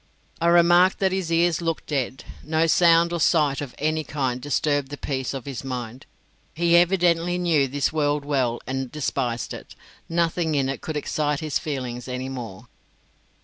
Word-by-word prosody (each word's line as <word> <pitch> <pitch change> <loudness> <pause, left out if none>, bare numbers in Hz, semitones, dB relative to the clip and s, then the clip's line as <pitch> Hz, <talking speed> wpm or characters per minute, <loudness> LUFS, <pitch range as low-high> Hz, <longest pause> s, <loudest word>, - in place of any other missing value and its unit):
I 170 - +2
remarked 175 +2 +5
that 190 -1 +1
his 185 -3 -2
ears 170 -1 +2
looked 165 -1 -2
dead; 135 -3 -3 0.2
no 160 +2 +1
sound 170 0 +4
or 170 - -1
sight 150 -4 +2
of 140 -4 -7
any 155 +1 0
kind 130 -4 -2
disturbed 145 0 0
the 145 - -7
peace 130 -3 -3
of 135 -3 -6
his 135 -3 -6
mind. 125 -1 -6 0.5
He 170 +1 +3
evidently 175 -1 +3
knew 165 -6 +2
this 140 +3 -1
world 145 -2 0
well 130 -5 0
and 130 -1 -4
despised 130 -5 -2
it; - - -10 0.3
nothing 165 -1 0
in 135 -2 +1
it 135 - -4
could 155 -1 -4
excite 150 0 -1
his 155 -2 -1
feelings 125 -5 -5
any 130 +1 -4
more. 115 -5 -7
150 Hz, 170 wpm, -24 LUFS, 135-170 Hz, 0.5 s, remarked